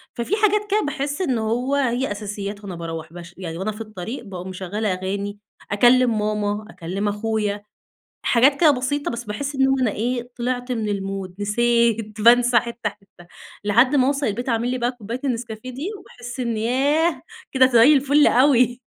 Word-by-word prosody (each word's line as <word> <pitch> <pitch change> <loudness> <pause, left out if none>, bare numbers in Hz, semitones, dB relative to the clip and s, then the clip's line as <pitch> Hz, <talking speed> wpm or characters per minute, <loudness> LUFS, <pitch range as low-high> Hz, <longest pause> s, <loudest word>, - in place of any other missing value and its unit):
ففي 235 - -1
حاجات 420 -1 +3
كده 425 +1 +3
باحس 290 +1 -3
إن 265 -10 0
هو 240 +5 -1
هي 260 -2 0
أساسيات 205 0 -5
وأنا 190 -3 -6
باروَّح 165 -1 -6
باش 175 0 -11
يعني 170 -3 -6
وأنا 195 +4 -2
في 215 +1 -9
الطريق 215 +3 -6
باقوم 185 -3 -7
مشغّلة 190 +2 -2
أغاني، 200 +2 -4 0.3
أكلّم 240 +2 +4
ماما 210 0 -1
أكلّم 190 +3 -4
أخويا، 210 -1 -2 0.6
حاجات 270 +4 +4
كده 315 -3 +7
بسيطة 285 +2 -2
بس 235 0 -5
باحس 255 +7 -4
إن 265 0 +3
أنا 240 -4 +2
إيه، 240 +3 -3
طلِعت 245 +1 -3
من 220 -3 -2
المود 195 -2 -4
نسيت 225 0 +1
بانسى 240 +1 +6
حِتّة 235 -2 -4
حِتّة 195 -4 -19 0.4
لحد 235 +7 +4
ما 260 -2 +4
اوصَل 280 0 0
البيت 240 +5 -3
أعمل 235 +1 0
لي 255 - -1
بقى 240 0 0
كوباية 235 0 -6
النسكافيه 235 -1 -4
دي 280 +9 -5
وباحس 245 -8 -10
إني 230 -3 -2
ياه، 290 +7 +1 0.3
كده 260 -1 +5
زي 255 +3 +6
الفل 285 +1 +4
أوي، 250 -1 +3
235 Hz, 170 wpm, -22 LUFS, 205-255 Hz, 0.6 s, كده